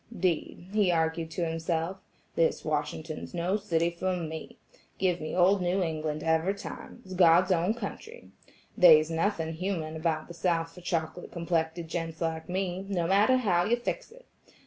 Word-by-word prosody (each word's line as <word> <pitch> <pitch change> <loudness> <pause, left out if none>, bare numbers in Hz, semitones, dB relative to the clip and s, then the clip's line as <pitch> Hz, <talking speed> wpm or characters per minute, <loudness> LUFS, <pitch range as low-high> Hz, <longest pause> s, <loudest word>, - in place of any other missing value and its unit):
"'Deed," 175 -1 -1
he 205 -4 +3
argued 160 0 0
to 170 +1 -2
himself, 165 +2 -2 0.4
"this 165 - +1
Washington's 155 +2 -3
no 175 +3 0
city 170 -4 0
for 185 +2 -2
me. 160 -2 -6 0.4
Give 180 -2 +1
me 155 - -4
old 185 +2 +4
New 180 +2 +1
England 155 -2 -3
every 160 +4 +2
time; 200 - -9
it's 185 - -8
God's 180 +1 +5
own 180 +5 +2
country. 440 - -8 0.4
They's 160 -3 +7
nuthin' 165 -1 0
human 165 -2 -3
about 160 -1 -1
the 170 - -9
South 165 -1 0
for 180 - -12
chocolate 170 -1 -3
complected 165 -1 -1
gents 165 -1 -4
like 160 0 -3
me, 185 0 -2
no 175 -4 0
matter 205 +8 +4
how 185 -8 +2
you 235 - +3
fix 450 - -4
it. - - -16
170 Hz, 165 wpm, -29 LUFS, 160-185 Hz, 0.4 s, They's